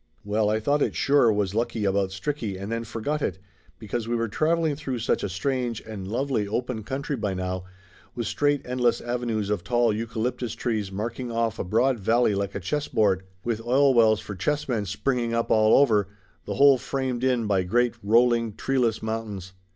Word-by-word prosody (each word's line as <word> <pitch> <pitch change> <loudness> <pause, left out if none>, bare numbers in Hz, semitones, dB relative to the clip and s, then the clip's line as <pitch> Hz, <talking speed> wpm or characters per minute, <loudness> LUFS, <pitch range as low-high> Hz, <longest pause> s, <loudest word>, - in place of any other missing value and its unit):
Well, 105 +1 +1
I 110 +1 +1
thought 145 +6 +1
it - - 0
sure 140 -5 +4
was 105 -2 0
lucky 115 -1 -1
about 100 0 +1
Stricky, 100 -1 -4
and 100 +3 -5
then 115 0 -2
forgot 145 +8 -3
it, - - -1 0.4
because 110 +1 -4
we 120 - 0
were 115 0 0
traveling 160 +5 +1
through 135 -4 -4
such 115 - 0
a - - -2
strange 120 +4 -2
and 105 -4 -7
lovely 120 -1 -1
open 120 +2 -2
country 140 +5 -3
by 105 -5 -2
now, 90 0 -3 0.5
with 120 -1 -3
straight 145 +4 0
endless 125 -1 +1
avenues 120 -4 -2
of 100 -4 -1
tall 120 -1 +2
eucalyptus 115 +2 -3
trees 110 -5 -2
marking 115 +5 -4
off 115 -1 -1
a - - 0
broad 120 +6 +1
valley 115 +2 +2
like 100 0 -2
a - - -2
chess 145 - -2
board, 100 -4 +2 0.2
with 115 -2 -2
oil 135 +3 +4
wells 110 -3 +5
for 105 - -7
chess 145 +11 -1
men 110 -6 -1
springing 120 +3 -1
up 115 - -1
all 110 0 +5
over, 110 -8 +3 0.4
the - - -4
whole 140 -2 +6
framed 130 -2 -2
in 125 -3 +2
by 100 -3 +2
great, 120 +7 +1
rolling, 115 +1 +3
treeless 125 -5 0
mountains. 105 -4 -4
115 Hz, 190 wpm, -25 LUFS, 105-125 Hz, 0.5 s, whole